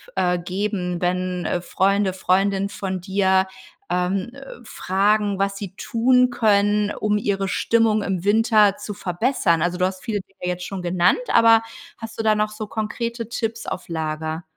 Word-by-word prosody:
äh, 180 0 +1
geben, 180 0 -3
wenn, 180 0 -1
äh, 175 - -1
Freunde, 195 +2 +1
Freundinnen 195 +1 +1
von 190 -2 -4
dir, 190 0 +2 0.5
ähm, 185 +4 -1
äh, 275 - -12 0.2
fragen, 205 0 0
was 195 0 -1
sie 195 -2 -7
tun 250 +3 +2
können, 210 -2 +2
um 210 0 0
ihre 195 -1 -1
Stimmung 225 +1 +2
im 190 -3 -2
Winter 210 -1 +4
zu 210 -1 -7
verbessern. 180 - 0
Also, 175 +2 0
du 180 - +2
hast 185 0 -3
viele 210 -3 -2
Dinge 185 -1 -6
jetzt 180 0 -5
schon 195 -2 -5
genannt, 175 - +2
aber 230 -1 +6 0.4
hast 225 -1 -8
du - - 0
da 215 -1 +4
noch 210 0 0
so 215 0 -6
konkrete 230 +2 -4
Tipps 225 -1 -4
auf 185 - -5
Lager? 160 0 -3
200 Hz, 165 wpm, -22 LUFS, 180-215 Hz, 0.5 s, aber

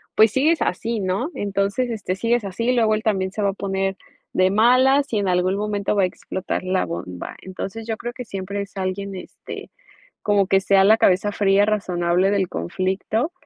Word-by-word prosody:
pues, 220 0 +6
sigues 310 +6 +2
así, 225 +4 -1
¿no? 195 - -1
Entonces, 200 +5 -1
este, 205 -5 -3
sigues 230 +2 +1
así, 230 +6 -1
luego 225 -3 +3
él 215 - -4
también 190 -3 0
se 210 - -4
va 200 - +2
a - - -2
poner 195 -1 -2 0.4
de 185 0 +3
malas, 255 +6 +4
y 215 - +2
en 200 - -1
algún 180 +1 +2
momento 205 0 -1
va 200 - +3
a - - +5
explotar 185 +1 -4
la 185 - 0
bomba. 85 +1 -6
Entonces, 195 +4 -6
yo 225 - -2
creo 240 +2 -5
que 250 - -7
siempre 200 -1 -4
es 200 0 -9
alguien, 195 +1 -3
este, 185 - -9 0.5
como 205 -2 +2
que 195 0 +3
sea 195 0 +4
la 220 +2 +6
cabeza 195 +1 +3
fría, 200 0 +3
razonable 185 -3 +1
del 195 -3 +1
conflicto 190 - -2
200 Hz, 190 wpm, -22 LUFS, 190-220 Hz, 0.5 s, pues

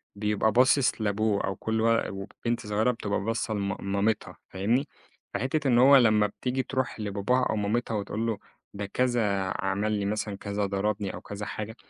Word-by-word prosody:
بيبقى 105 +1 +1
باصِص 130 0 +3
لأبوه، 105 0 +1
أو 95 - -2
كل 110 +4 -1
ول 115 0 +2
وبنت 105 +5 -4
صغيرة 110 +4 +2
بتبقى 100 -4 -2
باصّة 110 +1 -2
لم 100 -2 -1 0.2
مامتها 105 +2 0
فاهمني؟ 115 +9 0 0.5
فحتّة 140 +2 -1
إن 120 -2 +4
هو 135 +3 +8
لمّا 110 -4 +5
يتيجي 125 +5 -2
تروح 130 -3 -2
لباباها 105 +5 0
أو - - 0
مامتها 110 +3 -1
وتقول 105 +2 -3
له 110 -2 -1 0.4
ده 100 0 -4
كذا، 110 -4 +1 0.2
عمل 100 +2 0
لي 100 -2 -1
مثلًا 105 0 -2
كذا، 100 0 -2
ضربني 100 0 -1
أو - - -7
كذا 105 +1 -6
حاجة، 110 +2 -5
105 Hz, 170 wpm, -27 LUFS, 100-120 Hz, 0.5 s, هو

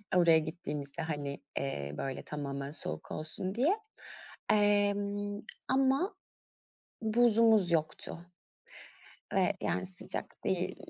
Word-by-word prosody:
Oraya 165 -3 +7
gittiğimizde 155 -2 -5
hani, 145 -3 -3 0.2
eee, 70 - -3
böyle 135 -1 -3
tamamen 140 -1 -4
soğuk 80 - -5
olsun 185 +5 -3
diye. 315 - +3 0.7
Emm, 205 0 +2 0.3
ama 270 +9 +3 0.9
buzumuz 220 -4 +5
yoktu 155 0 -1 1.2
ve - - +3
yani 90 0 0
sıcak 95 - -7
değil, - - 0
175 Hz, 95 wpm, -32 LUFS, 145-215 Hz, 1.2 s, Oraya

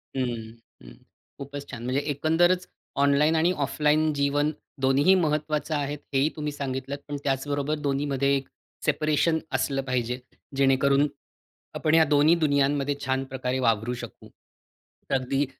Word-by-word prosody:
हं, 130 - +1
हं, 120 -1 -2 0.5
हं, - - -15
हं. - - -11 0.5
खूपच 140 0 -7
छान. 120 - -7
म्हणजे 130 +3 0
एकंदरच 175 +5 +2 0.4
ऑनलाईन 145 +3 +3
आणि 165 +2 +3
ऑफलाईन 150 +3 +2
जीवन 145 +1 +1 0.3
दोन्हीही 135 +7 +4
महत्त्वाचं 155 -2 0
आहेत 145 0 -2
हेही 135 +3 +3
तुम्ही 150 -1 -3
सांगितलत. 135 -1 -4
पण 145 -1 -4
त्याचबरोबर 145 +2 -1
दोन्हीमध्ये 140 -1 0
एक 135 -1 -3 0.4
सेपरेशन 155 +2 +2 0.2
असलं 135 +1 0
पाहिजे. 125 -1 -2 0.4
जेणेकरून 140 +1 +3 0.7
आपण 155 - 0
ह्या 165 - +7
दोन्ही 150 +3 +5
दुनियांमध्ये 140 0 +1
छान 130 0 0
प्रकारे 130 0 -2
वावरू 115 -1 +1
शकू. - - -10 0.9
अगदी 135 +2 0
140 Hz, 135 wpm, -26 LUFS, 135-150 Hz, 0.9 s, ह्या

